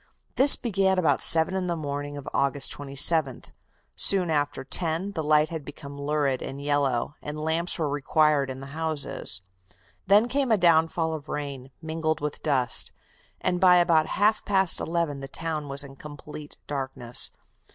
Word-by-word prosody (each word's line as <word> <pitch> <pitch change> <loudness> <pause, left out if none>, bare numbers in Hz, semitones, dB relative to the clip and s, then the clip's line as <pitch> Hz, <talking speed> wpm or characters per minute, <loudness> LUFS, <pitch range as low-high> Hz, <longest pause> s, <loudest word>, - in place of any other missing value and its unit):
This 280 +2 +9
began 195 -5 0
about 180 -3 +1
seven 165 +3 +5
in 185 -1 -2
the 170 - -2
morning 145 -2 -5
of 140 - -10
August 140 0 +1
27th. 140 0 +2 0.4
Soon 185 -4 +2
after 145 -3 -2
ten 165 +6 -2
the 160 -5 -4
light 150 0 +2
had 160 -3 -6
become 140 -1 -10
lurid 140 -2 -1
and 135 - -7
yellow, 140 -3 -1
and 150 +1 -7
lamps 160 +3 -2
were 160 -3 -1
required 145 0 +1
in 130 0 -7
the 135 +1 -10
houses; 155 -11 -2 0.6
then 205 +4 +4
came 270 0 -1
a 220 - +4
downfall 165 -2 +2
of 155 -1 -8
rain, 140 -3 -6
mingled 160 -1 -2
with 150 0 -5
dust, 130 -5 +1 0.5
and 180 -1 -1
by 180 -1 +6
about 170 -3 +3
half 210 +2 +2
past 190 -3 +2
eleven 165 -4 -2
the 135 - -8
town 155 0 -4
was 140 +1 -2
in 135 -1 -12
complete 150 +1 -11
darkness. 130 -4 -1
155 Hz, 160 wpm, -25 LUFS, 140-170 Hz, 0.6 s, This